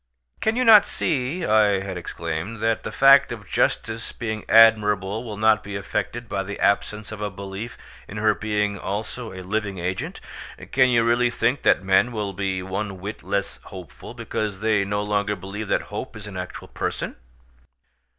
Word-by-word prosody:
"Can 220 +1 +1
you 255 - +2
not 215 -3 +9
see," 155 +3 -2
I 105 -3 +3
had 95 -1 -5
exclaimed, 85 +4 -5
"that 115 0 +1
the - - -6
fact 135 0 +6
of 105 -5 -7
justice 115 +6 -1
being 110 -2 -5
admirable 105 -2 +5
will 110 -4 -7
not 110 0 +4
be 100 0 -7
affected 105 +4 -3
by 100 - -2
the 100 +1 -6
absence 105 +1 0
of 110 -1 -7
a 105 - -1
belief 100 +3 -7 0.3
in 100 - -8
her 110 0 +3
being 105 -2 -1
also 110 +5 -4
a 95 -1 -8
living 100 0 -2
agent? 90 +2 -4 0.5
Can 130 -1 +4
you 120 -2 +3
really 120 +1 +3
think 120 +3 0
that - - +3
men 95 +6 +3
will 105 -3 -3
be 95 -1 -2
one 95 +1 -4
whit 100 +4 -6
less 100 0 -3
hopeful, 95 -3 -10
because 105 -3 -3
they 110 -2 +2
no 105 +1 -1
longer 105 0 0
believe 100 +3 -6
that - - +1
hope - - -5
is 105 -1 -9
an 105 -2 -8
actual 90 0 -7
person?" - - -4
105 Hz, 180 wpm, -23 LUFS, 100-115 Hz, 0.5 s, not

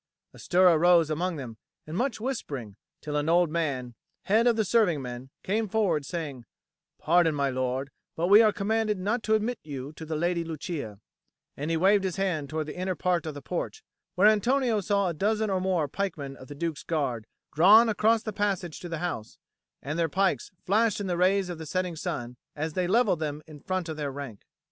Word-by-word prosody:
A - - -15
stir 185 +1 +4
arose 170 -1 +5
among 175 +3 -1
them 125 -6 -7 0.3
and 155 - -7
much 250 +4 -1
whispering, 145 - -4 0.3
till 150 -1 -4
an 150 +2 0
old 170 -1 +3
man, 140 -7 -2 0.3
head 225 +4 +3
of 235 - +4
the 220 - +2
servingmen, 145 - 0
came 215 +3 0
forward, 180 -10 +1
saying: 145 -8 -5 0.5
"Pardon, 165 -1 +3
my 140 -1 0
lord, 130 +2 -2 0.2
but 165 - 0
we 205 +4 +8
are 215 -2 +5
commanded 215 +1 0
not 210 +6 -1
to 220 0 +2
admit 220 +3 -1
you 140 -1 -7
to 160 - -10
the 160 0 -4
Lady 170 +2 0
Lucia;" 155 - -5 0.6
and 145 +3 -4
he 165 - +1
waved 195 +3 +4
his 185 -2 -2
hand 175 -8 -1
towards 155 0 -2
the 150 - -7
inner 185 0 -2
part 175 -3 0
of 155 - -5
the 145 - -9
porch, 440 - -4 0.3
where 190 +2 +4
Antonio 230 +1 +3
saw 200 0 +1
a 175 - -1
dozen 215 +5 0
or 190 -1 0
more 180 -5 +1
pikemen 150 -7 -4
of 130 - -13
the 145 - -9
Duke's 160 0 -3
Guard 130 -9 -2 0.3
drawn 205 +9 +7
across 220 +1 +2
the 215 - -4
passage 195 -5 -2
to 175 - -8
the 165 - -3
house; 115 -11 -5 0.5
and 150 +5 -3
their 165 -1 +1
pikes 195 +5 0 0.2
flashed 215 +2 +2
in 205 - -3
the 180 -2 -1
rays 185 +2 +2
of 175 -2 -6
the 160 - -7
setting 180 +1 -2
sun 125 -8 -5 0.2
as 155 +1 -3
they 180 +1 0
levelled 210 -3 +3
them 150 -1 -4
in 155 -2 -12
front 185 +3 -3
of 160 -1 -5
their 145 -2 -3
rank. 135 -7 -8
175 Hz, 205 wpm, -27 LUFS, 150-200 Hz, 0.6 s, we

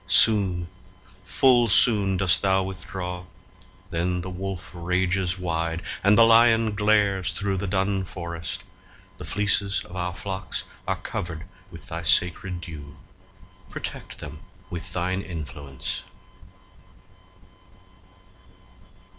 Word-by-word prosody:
Soon, 95 -2 +6 0.5
full 120 +5 +4
soon, 100 -2 +4
Dost 90 -1 +3
thou 95 -1 +2
withdraw; 90 -1 -6 0.7
then 90 +2 -1
the 95 +1 -6
wolf 95 -1 -6
rages 90 +1 0
wide, 85 -2 -2 0.2
And 100 +1 +5
the 115 - +8
lion 115 -1 +5
glares 105 -2 +2
through 100 -2 -1
the 100 +2 -2
dun 95 +1 0
forest: 85 -4 -5 0.6
The - - -6
fleeces 100 -1 +2
of 90 +1 -11
our 90 -1 -3
flocks 95 -2 -4 0.2
are - - +1
covered 80 -2 -5 0.2
with 85 -4 -11
Thy 80 +1 -4
sacred 90 +3 +2
dew; 75 -3 -9 0.7
protect - - -6
them - - -9 0.3
with 85 -1 -4
thine 90 +2 -1
influence! 75 -6 -5
95 Hz, 110 wpm, -25 LUFS, 85-100 Hz, 0.7 s, the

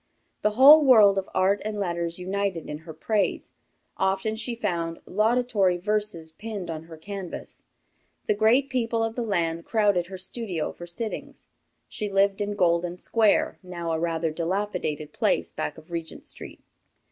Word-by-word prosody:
The 210 - +3
whole 295 +4 +9
world 215 -7 +7
of 190 - -7
art 195 +2 +2
and 210 0 -3
letters 170 -3 -2
united 190 -2 -2
in 150 0 -5
her 160 +1 -10
praise. 205 +5 -1 0.5
Often 195 +3 0
she 235 +1 -3
found 170 -6 -2
laudatory 215 -3 +2
verses 205 -4 -2
pinned 205 -1 -6
on 160 0 -6
her 165 -1 -11
canvas. 190 +2 -7 0.6
The - - +2
great 225 +6 +3
people 230 -3 0
of 225 0 -1
the 245 - -2
land 170 -7 -1
crowded 205 -6 +2
her 190 0 -7
studio 185 -3 -3
for 175 - -10
sittings. 215 +6 -6 0.4
She 215 -3 -4
lived 195 +1 +2
in 205 0 -2
Golden 175 -1 +1
Square, 220 +2 +2
now 175 -3 -5
a 160 - 0
rather 165 -1 -1
dilapidated 170 -3 -2
place - - +1
back 75 - -4
of 160 +2 -15
Regent 165 -2 -6
Street. - - -9
195 Hz, 160 wpm, -26 LUFS, 170-215 Hz, 0.6 s, whole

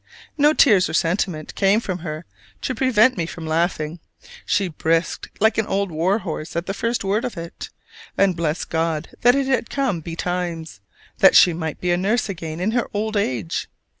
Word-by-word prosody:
No 295 0 +4
tears 210 -12 +5
or - - -2
sentiment 165 -2 -1
came 200 +2 +3
from 185 -5 -4
her 155 -1 -6 0.4
to - - -2
prevent 255 -2 +3
me 165 0 -2
laughing: 160 0 -1 0.5
she 195 0 +1
brisked 165 +1 -1
like 220 +1 +3
an 220 - 0
old 195 -1 -1
war 170 +6 +1
horse 165 -5 -6
at 170 +1 -1
the 195 - -3
first 230 +4 -2
word 200 +4 0
of 250 -6 -4
it, 165 0 -7 0.5
and 195 -2 +3
blessed 165 -1 -2
God 160 -2 -1
that 245 +2 +5
it 275 -1 +1
had 260 -3 0
come 265 -11 -1
betimes, 165 - -4 0.4
that - - +6
she 175 - +7
might 160 -2 -4
be 180 - 0
a 175 - +2
nurse 210 +5 0
again 165 -4 -5
in 195 +5 0
her 240 0 -1
old 215 +1 -1
age! 125 - -2
180 Hz, 185 wpm, -22 LUFS, 165-215 Hz, 0.5 s, she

